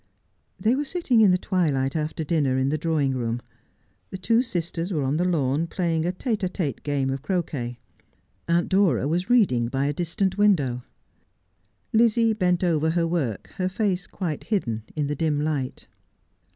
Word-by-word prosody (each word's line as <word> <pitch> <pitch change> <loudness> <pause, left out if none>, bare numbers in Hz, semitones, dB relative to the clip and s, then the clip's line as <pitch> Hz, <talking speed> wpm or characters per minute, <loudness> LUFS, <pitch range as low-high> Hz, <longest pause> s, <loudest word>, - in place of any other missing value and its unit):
They 225 +4 +2
were 290 - 0
sitting 275 -6 +1
in 210 - +6
the 180 - +4
twilight 150 -8 0
after 155 +1 -2
dinner 145 -5 +1
in 130 +1 +1
the 155 - 0
draw 160 0 0
ing 135 -2 +1
room. 120 -1 -2 0.7
The 190 - -6
two 225 +5 +2
sisters 175 -5 -3
were 155 -6 0
on 135 +3 0
the 175 - +1
lawn 155 -2 +1
playing 165 -2 -1
a - - +1
tete 215 +4 -2
d 190 - 0
t'Ue 165 - -3
game 140 -2 -1
of 135 0 -3
croquet. 145 -8 -3 0.7
Aunt 170 +1 +2
Dora 190 -7 +2
was 175 +7 -1
reading 180 - +3
by 135 +3 -1
a 145 - 0
distant 180 +4 -1
window. 145 -13 +2 1.1
Lizzie 230 0 +4
bent 180 -4 +1
over 160 -3 +2
her 165 +1 +1
work, 160 - -2
her 185 0 0
face 190 -2 -1
quite 165 -6 -4
hidden 120 - -1
in 150 -2 0
the 145 - -1
dim 150 0 0
light. 145 -4 -3
165 Hz, 180 wpm, -25 LUFS, 140-190 Hz, 1.1 s, in